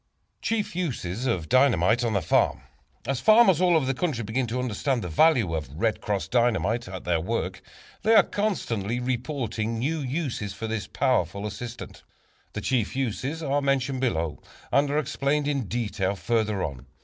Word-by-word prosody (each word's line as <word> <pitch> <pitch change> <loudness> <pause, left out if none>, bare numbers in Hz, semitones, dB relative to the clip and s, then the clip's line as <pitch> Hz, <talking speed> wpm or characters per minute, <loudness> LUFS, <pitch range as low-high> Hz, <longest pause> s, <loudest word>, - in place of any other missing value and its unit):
Chief 215 -5 -1
Uses 125 - -2
of 90 -10 -1
Dynamite 120 - +4
on 115 -2 0
the 100 - 0
Farm. - - +2 0.4
As 135 0 -1
farmers 215 - +6
all 180 -2 +4
over 155 -4 +3
the 135 - +1
country 135 -5 -2
begin 120 +4 -1
to 115 +3 -3
understand 125 +1 -1
the - - -3
value 115 - +4
of 80 -4 -3
"Red 110 0 0
Cross" 100 -2 -2
Dynamite 120 -2 +1
in 95 -1 -7
their 85 -2 +1
work, 115 +8 -3 0.4
they 225 +1 +4
are - - +8
constantly 120 - -2
reporting 120 -3 -2
new 150 +8 -1
uses 130 - -3
for 110 - -5
this 110 -2 -3
powerful 100 +1 0
assistant. 115 +3 -7 0.5
The - - -4
chief 125 -4 0
uses 135 +5 -2
are 145 0 +1
mentioned 135 -1 0
below 80 - -1 0.3
and 140 +2 +3
are 145 - 0
explained 145 -1 0
in 140 -7 -1
detail 100 -4 -1
further 105 +1 0
on. 70 -3 -5
120 Hz, 170 wpm, -26 LUFS, 105-140 Hz, 0.5 s, are